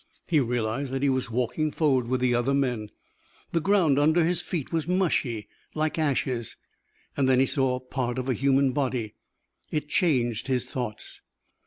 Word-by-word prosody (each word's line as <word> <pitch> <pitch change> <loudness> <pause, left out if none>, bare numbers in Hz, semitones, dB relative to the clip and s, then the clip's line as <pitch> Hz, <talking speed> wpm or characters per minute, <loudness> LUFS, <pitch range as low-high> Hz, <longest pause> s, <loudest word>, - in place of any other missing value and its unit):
He 160 -3 +3
realized 120 +1 -1
that 135 +1 -2
he 140 - +3
was 130 -2 -1
walking 125 +6 0
forward 135 -7 +1
with 130 +1 0
the 125 -1 +2
other 120 +3 +1
men. 125 -6 -1 0.6
The 165 - +1
ground 170 -6 +3
under 160 +3 +4
his 175 +1 +1
feet 170 -6 -4
was 160 -1 0
mushy, 155 - 0 0.3
like 155 0 -1
ashes. 130 -6 -1 0.6
Then 130 -2 +3
he 135 - +5
saw 130 -2 +1
part 130 -1 -3
of 130 0 -3
a 130 - +2
human 135 +1 +2
body. 125 -5 -2 0.6
It 150 -1 -3
changed 125 - +1
his 125 -2 0
thoughts. 120 -4 -6
130 Hz, 165 wpm, -26 LUFS, 125-150 Hz, 0.6 s, he